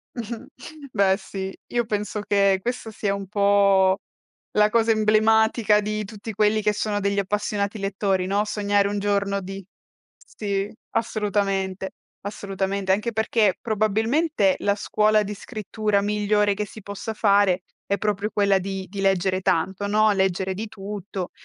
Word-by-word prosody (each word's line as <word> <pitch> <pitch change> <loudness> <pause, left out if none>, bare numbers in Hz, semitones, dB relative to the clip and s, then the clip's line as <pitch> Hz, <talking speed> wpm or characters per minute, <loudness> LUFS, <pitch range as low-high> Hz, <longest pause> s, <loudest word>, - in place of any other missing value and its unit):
Mh-mh, 235 +1 -6 0.5
beh 195 -2 +3
sì, 195 -1 -6
io 240 0 0
penso 210 -1 -2
che 200 -2 +3
questa 240 +1 -4
sia 205 -2 -1
un 200 -1 -5
po' 200 -2 +4 0.6
la 210 0 +4
cosa 230 0 +2
emblematica 220 0 +4
di 215 +1 -3
tutti 215 +2 -8
quelli 210 +1 +3
che 210 - +2
sono 205 0 -1
degli 200 0 0
appassionati 205 +1 -1
lettori, 195 -1 0
no: 200 +2 +1
sognare 205 -1 +1
un 205 0 -2
giorno 200 -1 0
di 195 +1 -7 0.5
sì, 200 -1 -3 0.2
assolutamente, 195 -3 -1 0.3
assolutamente. 195 -1 -2
Anche 210 +4 0
perché 220 -2 +2
probabilmente 220 - +1
la 200 0 +2
scuola 215 +1 +2
di 205 0 -5
scrittura 210 -1 -2
migliore 210 0 +2
che 210 +1 -3
si 215 +1 -12
possa 205 +3 -6
fare 200 -4 +3 0.3
è 200 - +2
proprio 210 0 -1
quella 200 -1 +3
di 190 0 -5
di 195 +1 -6
leggere 190 -1 +1
tanto, 190 +4 0
no, 215 +1 +3
leggere 190 -1 0
di 215 +4 -4
tutto. 195 -2 -6
205 Hz, 145 wpm, -24 LUFS, 195-215 Hz, 0.6 s, po